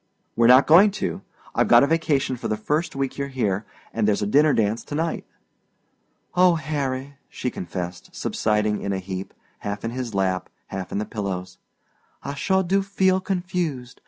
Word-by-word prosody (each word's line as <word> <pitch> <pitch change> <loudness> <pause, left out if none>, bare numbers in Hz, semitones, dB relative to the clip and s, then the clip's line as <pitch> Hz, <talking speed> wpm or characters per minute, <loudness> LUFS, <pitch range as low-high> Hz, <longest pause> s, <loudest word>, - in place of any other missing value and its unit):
"We're 115 0 +4
not 130 +3 +8
going 180 +7 +7
to. - - -3 0.3
I've - - +2
got 120 +1 +7
a - - +6
vacation 145 -4 +1
for 120 - -5
the 110 - -1
first 150 +9 -1
week 135 0 -2
you're 140 - -1
here, 110 -7 -1 0.3
and 110 -2 +1
there's 105 -1 +2
a - - +1
dinner 145 +8 +4
dance 110 -2 +1
to 145 - -5
night." 165 +1 -2 1.1
"Oh, 180 -1 +5
Harry," 140 -2 -3
she 125 - -3
confessed, 90 -1 -6
subsiding 105 -1 0
in 100 - -2
a - - -1
heap, 95 0 -5 0.3
half 100 +1 -4
in 115 - -2
his 120 -3 -4
lap, 95 -1 0 0.2
half 95 -1 -5
in - - -2
the 105 - -1
pillows, 95 -4 -5 0.6
"I 140 - -4
sure 190 +7 +1
do 195 +3 +2
feel 190 -1 +2
confused. 175 -9 -3
130 Hz, 180 wpm, -24 LUFS, 105-155 Hz, 1.1 s, not